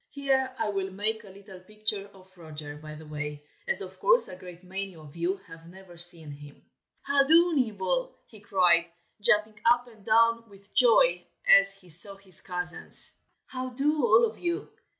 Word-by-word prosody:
Here 265 -2 -1
I 225 -2 -2
will 195 -1 -3
make 210 +3 -2
a 200 - -14
little 195 -1 -14
picture 210 +1 -3
of 185 0 -20
Roger, 155 -3 -9
by 155 0 -11
the 155 +1 -12
way, 150 -1 -7 0.2
as 485 - +2
of - - -10
course - - +3
a - - -10
great 180 -1 -13
many 190 0 -7
of 155 -2 -15
you 175 +3 -2
have 165 0 -14
never 185 -1 -15
seen 170 -3 -7
him. 145 0 -14 0.4
"How 280 0 +2
do, 335 +3 +5
Nibble?" 255 - -1
he 220 - -17
cried, 180 -4 +3 0.3
jumping 215 0 +3
up 240 +1 +3
and 220 -4 -18
down 230 +1 +2
with 200 0 -20
joy 180 -8 +4 0.2
as 195 0 +7
he 185 -2 -17
saw 180 +5 +4
his 195 -4 +1
cousins. 180 -1 -2 0.3
"How 255 0 -6
do, 285 +3 -1
all 230 0 +5
of 225 0 -7
you! 345 +3 -3
195 Hz, 180 wpm, -27 LUFS, 175-230 Hz, 0.4 s, as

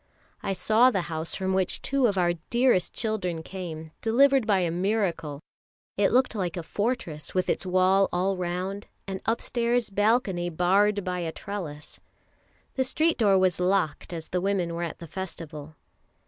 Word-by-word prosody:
I 195 - -1
saw 220 +7 +4
the 195 -8 -1
house 160 +1 -3
from 190 0 -1
which 190 -1 0
two 275 -2 +2
of 200 -3 -1
our 175 -1 +3 0.2
dearest 240 -7 +3
children 185 -7 -2
came, 160 -4 -7
delivered 265 +1 +4
by 195 -3 +3
a 170 -2 0
miracle; 175 -6 -1 0.5
it 200 -1 +2
looked 255 0 +3
like 185 -5 -2
a 170 - -3
fortress 200 -7 -3
with 185 - +1
its 190 - -1
wall 185 +1 +3
all 190 +2 +1
round, 185 +3 -3 0.2
and 190 -1 -4
upstairs 235 0 0
balcony 205 -4 +1
barred 195 +5 +2
by 180 -1 -2
a 165 -2 -2
trellis. 165 -7 -7 0.7
The 265 - +1
street 315 +5 +1
door 200 -4 +5
was 185 -2 +2
locked 180 -5 0
as 165 -2 -6
the 180 - -1
women 185 -3 0
were 170 - -4
at 170 - -4
the 170 - -9
Festival. 160 -4 -7
190 Hz, 165 wpm, -27 LUFS, 175-215 Hz, 0.7 s, door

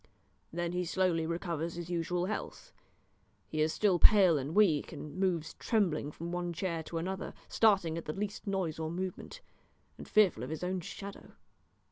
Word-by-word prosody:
Then 170 +1 -2
he 180 0 -1
slowly 175 -2 +1
recovers 170 -1 -2
his 175 0 -6
usual 175 +1 0
health. 215 +3 -5 0.7
He 155 - -2
is 155 +1 +3
still 190 -1 +2
pale 185 -7 +7
and 140 +4 -4
weak, 185 -9 +4
and 150 - -8
moves 180 -4 0
trembling 175 -10 +1
from 170 +3 -6
one 175 -1 -2
chair 170 -1 -2
to 165 - -4
another, 185 +3 -4
starting 190 -7 +3
at - - -10
the 155 - -3
least 205 +2 -4
noise 185 -5 -1
or 160 -1 -2
movement, 185 - -5 0.6
and - - -8
fearful 195 - +4
of 125 - -4
his 160 +2 -4
own 185 +1 -1
shadow. 200 +3 -8
175 Hz, 170 wpm, -32 LUFS, 160-190 Hz, 0.7 s, pale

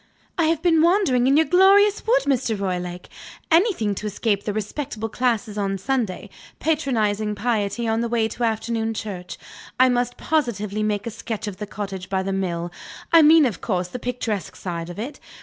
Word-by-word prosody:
"I 335 - +2
have 320 0 0
been 330 -3 +4
wandering 330 -8 +3
in 275 +2 +4
your 320 - +5
glorious 395 +4 +4
wood, - - +4
Mr. 250 -6 0
Roylake. 180 -2 -3 0.4
Anything 330 - +3
to 210 +2 -5
escape 205 0 -1
the 210 - -1
respectable 215 +2 -4
classes 225 -3 -1
on 195 -1 -1
Sunday, 220 -2 -2 0.3
patronizing 220 -9 0
piety 225 0 -1
on 225 +1 +1
the 235 - 0
way 230 -1 +1
to 240 - -5
afternoon 225 0 -1
church. 185 -5 -6 0.4
I 255 0 +6
must 245 0 0
positively 215 -9 -1
make 210 -1 -1
a 230 - -3
sketch 225 -1 -5
of 205 -3 -6
the 210 +1 -6
cottage 195 -3 -6
by 190 -1 0
the 195 0 -2
mill 175 -3 -2 0.4
I 330 - +9
mean, 315 0 +7
of 225 -9 -2
course, 180 -4 -1
the 250 - -6
picturesque 230 -5 -3
side 170 -2 -5
of 175 - -8
it. 260 +7 -6
225 Hz, 185 wpm, -23 LUFS, 200-265 Hz, 0.4 s, I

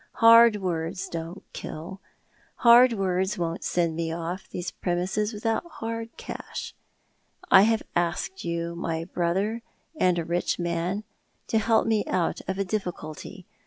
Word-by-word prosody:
Hard 230 -1 +7
words 180 +2 -2
don't 165 +3 -6
kill, 160 +3 -7
and 190 0 -9 0.6
hard 240 +1 +7
words 190 0 0
won't 165 -1 -3
send 170 -2 0
me 165 0 -2
off 170 +3 -5
these 175 0 -4
premises 185 +4 -1
Avithont 225 +9 -2
hard 230 0 -5
cash. - - -7 0.8
I 190 - +9
have 220 +1 +3
asked 175 +2 -1
you, 170 0 -3
my 165 -1 -3
brother, 190 +6 -1 0.3
and 180 - +2
a 170 - -1
rich 175 +2 0
man, 175 +4 -2 0.5
to 225 - +3
help 225 +1 +3
rae 220 -2 +2
out 180 -3 0
of 190 +1 -2
a 195 - 0
difficulty. 180 -3 -5
185 Hz, 145 wpm, -26 LUFS, 170-215 Hz, 0.8 s, I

